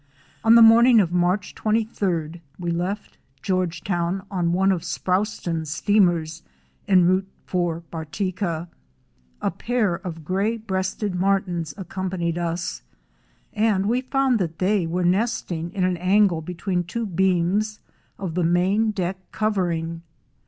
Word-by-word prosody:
On 225 +1 +6
the 230 - +9
morning 230 +1 +7
of 175 -5 +2
March 180 +2 0
23d, 190 -7 -1 0.2
we 175 -1 -3
left 180 +5 -3 0.2
Georgetown 180 0 -1
on 175 -3 0
one 190 +2 +3
of 180 -3 0
Sproston's 175 -3 -2
steamers 170 -3 +2 0.5
en 185 -3 +5
route 185 +2 +2 0.2
for 175 -2 -1
Bartica. 170 +1 -3 0.8
A - - +1
pair 230 -6 0
of 170 -3 -7
Gray 200 +7 0
breasted 190 -1 -2
Martins 180 -4 0
accompanied 185 -3 -3
us, 170 +1 -3 0.7
and 210 -3 +2
we 240 +4 +1
found 265 -2 +1
that 165 -4 -2
they 190 -2 +1
were 175 +2 -1
nesting 180 -4 0
in 190 - -2
an 180 -1 +1
angle 185 -1 +3
between 180 +2 -2
two 225 +7 -4
beams 190 +3 +1 0.4
of 185 -4 -4
the 180 +1 0
main 185 +6 +2
deck 190 -2 -2
covering. 170 -6 -1
185 Hz, 130 wpm, -23 LUFS, 170-205 Hz, 0.8 s, the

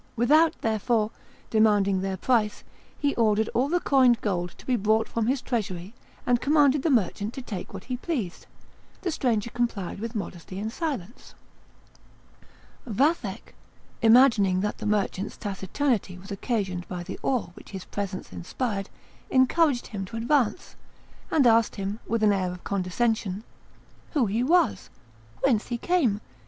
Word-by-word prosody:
Without, 305 +8 +4
therefore, 220 0 +1 0.4
demanding 205 -3 +3
their 190 0 -2
price, 210 -2 +1 0.3
he 285 -1 +1
ordered 220 -1 +2
all 260 +4 +1
the 355 +2 +2
coined 260 -7 +4
gold 180 -4 -1
to - - -15
be 255 - +2
brought 220 +1 +2
from 230 -1 -1
his 260 0 0
treasury, 195 -5 -3 0.3
and 245 0 +2
commanded 290 -1 +4
the 325 - +1
merchant 215 - 0
to 265 - -5
take 200 -7 -6
what 190 -1 -8
he 250 -1 -4
pleased; 245 - -4 0.5
the 360 - -1
stranger 235 -7 0
complied 225 -6 -2
with 230 +2 -5
modesty 185 -2 -6
and 215 +3 -3
silence. 260 - -5 1.5
Vathek, 230 - 0 0.5
imagining 225 -6 +5
that 210 +1 -2
the - - -3
merchant's 205 -1 -1
taciturnity 200 0 -2
was 190 +2 -12
occasioned 195 -4 -2
by 180 -1 -5
the 190 +2 -7
awe 250 -9 0
which - - -14
his 190 -2 -7
presence 195 -2 -5
inspired, 200 +2 -3 0.4
encouraged 260 +1 +3
him 200 -3 -5
to 225 +4 -7
advance, 245 - 0 0.5
and 295 -5 +3
asked 230 -1 +4
him, 200 +2 -4
with 230 -1 0
an 210 -1 +5
air 185 -2 0
of 180 0 -9
condescension, 200 +1 -1 0.7
"Who 285 -7 +3
he 215 +3 0
was? 270 - +2 0.5
whence 245 -6 +2
he 240 - -2
came? 245 - +1
220 Hz, 150 wpm, -26 LUFS, 195-255 Hz, 1.5 s, imagining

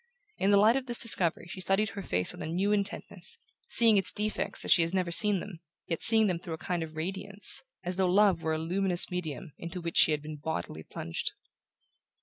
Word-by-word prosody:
In 195 - +1
the 200 - +4
light 215 +4 +4
of 270 -1 -3
this 240 -1 -1
discovery 180 -8 +3
she 185 +1 -9
studied 195 +3 0
her 200 - -8
face 90 - -1
with - - -12
a - - -5
new 185 +5 -1
intentness, 200 -3 -1 0.3
seeing 230 -3 +7
its 195 - +2
defects 210 +1 -1
as - - +6
she 175 - +3
had 165 +3 -2
never 180 -2 -1
seen 205 +2 +3
them, 185 -3 -10 0.3
yet 165 - -4
seeing 220 -1 +5
them 180 -4 -1
through 170 -2 -7
a - - -14
kind 175 +1 -4
of 160 -1 -8
radiance, 195 +5 0 0.2
as 180 0 -4
though 190 -1 +1
love 195 -2 +3
were 160 -1 -2
a - - -2
luminous 180 +3 +3
medium 160 -5 -6
into 170 +2 -7
which 170 -1 -5
she - - +5
had 150 -1 -2
been 155 0 -8
bodily 150 - -6
plunged. 80 +1 -5
180 Hz, 220 wpm, -28 LUFS, 165-200 Hz, 0.3 s, seeing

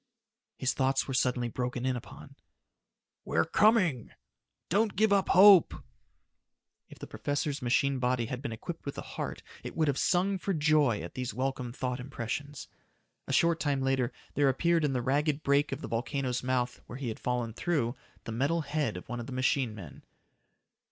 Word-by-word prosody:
His 130 -1 0
thoughts 135 0 +1
were 135 - -3
suddenly 125 -1 +1
broken 125 +1 -3
in 130 -1 +1
upon. 120 - -10 0.9
"We're - - +1
coming!" 175 - +3 0.6
"Don't 210 +3 +1
give 215 +1 +3
up 195 -1 +2
hope!" 195 -2 +7 1.1
If - - -13
the - - -8
professor's 145 0 -3
machine 130 +2 +1
body 125 -1 +1
had 125 +2 -5
been 140 -4 -4
equipped 160 +10 -7
with 140 - -6
a - - -5
heart, - - -6 0.2
it - - -7
would 160 -1 +2
have 140 -2 0
sung 190 +2 +1
for 195 +1 -1
joy 150 - +3
at 85 +1 -8
these 125 -4 -4
welcome 130 -1 -2
thought 125 +1 -3
impressions. 135 +3 -5 0.6
A - - -3
short 170 -1 +3
time 140 -3 0
later 135 -1 +1 0.2
there 145 -1 +3
appeared 170 +5 +2
in 145 -2 +1
the 125 -2 -1
ragged 145 +3 0
break 140 +1 +2
of 135 +2 -4
the - - -5
volcano's 125 +1 -2
mouth, 125 -1 -1
where 120 - -7
he 135 -3 -4
had 110 - -6
fallen 120 -2 -2
through, 135 -5 -1 0.3
the - - -6
metal 140 +9 0
head 145 - -2
of 90 - -10
one 120 -1 -4
of 120 - -6
the - - -7
machine 130 -2 0
men. 85 -10 -11
135 Hz, 180 wpm, -30 LUFS, 125-150 Hz, 1.1 s, hope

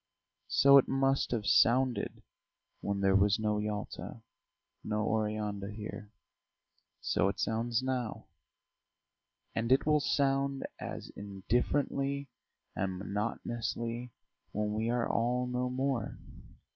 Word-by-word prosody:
So 140 0 +7
it - - +1
must 135 0 +2
have 115 -4 -1
sounded 125 +3 +3 0.6
when 100 -1 -2
there 95 0 +4
was 100 +1 +4
no 105 -1 0
Yalta, 105 +2 -5 0.6
no 105 0 -1
Oreanda 105 -2 -1
here; 105 -1 -7 0.9
so - - +2
it 100 - -2
sounds 115 +2 0
now, 130 -4 -2 1.3
and 115 +2 -1
it 130 - +5
will 150 0 +4
sound 140 -1 +1
as - - -6
indifferently 135 +7 -1 0.5
and 95 -1 -1
monotonously 115 +4 -3 0.4
when 105 0 -1
we 110 +2 0
are 120 0 +1
all 125 +2 +1
no 125 0 -1
more. 130 -3 -1
115 Hz, 110 wpm, -32 LUFS, 105-130 Hz, 1.3 s, So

